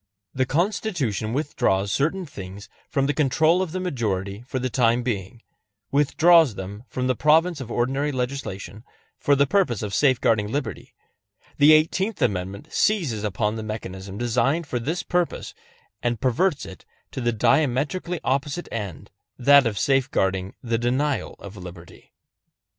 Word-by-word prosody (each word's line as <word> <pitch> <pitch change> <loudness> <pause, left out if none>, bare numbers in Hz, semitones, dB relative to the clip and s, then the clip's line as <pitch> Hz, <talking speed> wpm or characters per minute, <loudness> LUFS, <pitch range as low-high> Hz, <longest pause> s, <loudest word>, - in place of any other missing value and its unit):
The 130 -1 0
Constitution 155 - -1
withdraws 100 -8 0
certain 165 - 0
things 100 - -9 0.2
from 135 -1 +1
the 145 - +1
control 155 +5 +3
of 185 -4 -2
the 185 - -3
majority 105 - -2
for 130 - -3
the 130 0 -1
time 120 -1 +2
being 115 -1 -4 0.5
withdraws 150 -1 +5
them 100 +5 -7
from 125 - -3
the 130 - +2
province 160 +3 +3
of 125 - -7
ordinary 135 +5 0
legislation 125 -7 -4 0.4
for 145 - +3
the 140 +1 +4
purpose 140 - +1
of 100 -1 -4
safeguarding 115 -4 +2
liberty, 130 - -4 0.6
the 145 +2 +8
Eighteenth 185 +7 +2
Amendment 100 -2 -2
seizes 155 - +1
upon 105 +2 -1
the - - -4
mechanism 100 -3 -6
designed 125 +8 +1
for 125 -4 -3
this 160 +9 -2
purpose, 175 -1 -1 0.5
and 120 -2 -1
perverts 140 - +1
it 95 - -11 0.3
to 130 - -5
the 120 0 +1
diametrically 145 - +1
opposite 140 +5 -1
end, 100 -8 -6 0.3
that 140 0 +6
of 105 -3 -3
safeguarding 95 -8 0
the 115 -2 0
denial 130 +4 -1
of 100 0 -10
liberty. 90 -2 -12
130 Hz, 145 wpm, -24 LUFS, 105-150 Hz, 0.6 s, the